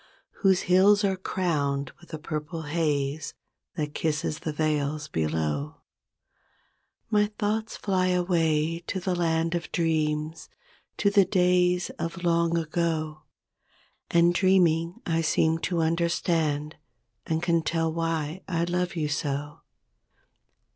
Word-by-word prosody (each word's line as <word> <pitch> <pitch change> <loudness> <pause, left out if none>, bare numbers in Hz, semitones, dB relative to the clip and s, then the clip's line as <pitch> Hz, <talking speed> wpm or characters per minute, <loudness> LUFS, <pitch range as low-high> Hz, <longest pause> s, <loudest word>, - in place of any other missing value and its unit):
Whose 190 -3 +4
hills 200 +3 +5
are 195 -1 +2
crowned 145 -7 -1
with 170 - -17
a 160 - -4
purple 155 +1 -5
haze 150 -2 -1 0.4
That 150 -1 -3
kisses 155 0 -1
the 155 - -3
vales 150 -1 -1
below; 75 - -2 1.3
My 210 -1 +4
thoughts 215 +1 -1
fly 185 -2 0
away 165 -3 +1
to 190 - -2
the 185 0 -1
land 165 -1 0
of 170 -1 -3
dreams, 155 -2 -1 0.5
To 200 - +2
the 200 -1 +6
days 180 -1 +2
of 170 +1 -4
long 170 0 +2
ago; 155 -1 -1 0.9
And, 170 +1 +4
dreaming, 175 -3 +2
I 165 -1 +1
seem 160 0 +2
to 175 -3 0
understand 160 -2 0 0.5
And 160 +1 -1
can 170 -1 +2
tell 165 0 0
why 165 0 -2
I 170 -3 0
love 175 +1 -1
you 155 -3 -1
so. 145 0 -3
165 Hz, 120 wpm, -26 LUFS, 155-180 Hz, 1.3 s, the